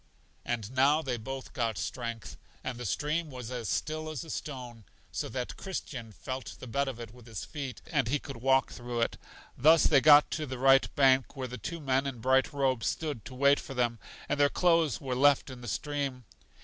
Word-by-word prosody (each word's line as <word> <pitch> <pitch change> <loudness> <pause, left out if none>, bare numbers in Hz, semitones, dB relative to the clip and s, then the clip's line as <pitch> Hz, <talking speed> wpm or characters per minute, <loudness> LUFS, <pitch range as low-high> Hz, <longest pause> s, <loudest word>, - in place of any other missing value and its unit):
And 115 -2 -3
now 140 +4 +3
they 130 -4 -1
both 135 +4 -7
got 115 -4 -1
strength, 115 +6 -5 0.3
and 125 -2 -4
the 120 - -3
stream 150 - -1
was 125 -3 -7
as 120 -4 -4
still 155 0 -2
as 155 -5 -5
a 160 - -8
stone, 125 -6 -6 0.3
so - - -3
that 125 +2 -4
Christian 130 - -6
felt 130 0 -6
the - - -8
bed 140 +4 0
of 130 -3 -5
it 115 -1 -8
with 125 -1 -15
his 110 -5 -6
feet, 140 -4 -6
and 140 -7 0
he 140 +5 +2
could 140 -2 -8
walk 135 +2 +3
through 120 -1 -4
it. 115 - 0 0.4
Thus 160 +5 +6
they 140 -3 +5
got 150 0 +7
to 155 -1 -2
the 130 0 -5
right 135 +1 +5
bank, 135 -1 +4
where 130 -2 -4
the 125 -1 -7
two 170 - -5
men 135 -2 +1
in 135 -3 -4
bright 130 +3 +2
robes 135 -4 0
stood 150 -9 -3
to 130 - -9
wait 140 +2 +4
for 135 - -8
them, 120 -2 0 0.3
and - - -1
their 145 0 +5
clothes 165 - +2
were 130 -2 -3
left 140 +1 +4
in 125 -1 -10
the 120 - -8
stream. 135 +2 -3
130 Hz, 215 wpm, -30 LUFS, 120-145 Hz, 0.4 s, got